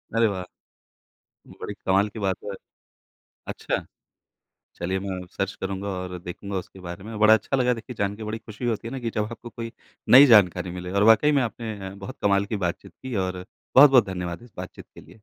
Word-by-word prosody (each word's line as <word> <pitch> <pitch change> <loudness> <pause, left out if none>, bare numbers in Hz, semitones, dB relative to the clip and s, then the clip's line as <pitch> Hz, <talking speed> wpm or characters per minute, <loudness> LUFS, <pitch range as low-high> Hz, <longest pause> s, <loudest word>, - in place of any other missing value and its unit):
अरे 115 -1 +4
वाह! 95 -3 -3 1.2
बड़ी 105 - -4
कमाल 95 +2 +3
की 110 - -9
बात 95 -2 0
है। 100 - -4 1.0
अच्छा! - - -3 0.9
चलिए 95 +2 -2
मैं 95 -1 -4 0.2
सर्च 95 +1 -2
करूँगा 95 +1 -3
और 90 -1 -4
देखूँगा 95 +3 -6
उसके 95 +1 -8
बारे 85 +1 -8
में। 110 0 -7
बड़ा 110 +1 +7
अच्छा 135 +4 +1
लगा 125 -1 +3
देखिए 120 +2 -8
जान 100 0 0
के 110 - -8
बड़ी 110 +1 -4
खुशी 110 +2 -8
होती 115 -1 -1
है - - -6
ना 135 - -4
कि 115 -1 -3
जब 105 - +1
आपको 120 +1 -9
कोई 115 0 -7 0.4
नई 135 +3 +10
जानकारी 90 -6 +5
मिले 90 0 -6
और 100 +1 +2
वाक़ई 115 +7 +6
में 140 -2 +3
आपने 115 -1 -4
अ, 95 - -8
बहुत 95 -1 -9
कमाल 100 0 +3
की 105 - -3
बातचीत 85 +1 -5
की 130 -3 -5
और 95 -1 -2 0.3
बहुत-बहुत 135 -4 +8
धन्यवाद 90 0 -5
इस 120 - -16
बातचीत 90 0 -8
के - - -11
लिए। - - -19
100 Hz, 205 wpm, -25 LUFS, 95-115 Hz, 1.2 s, नई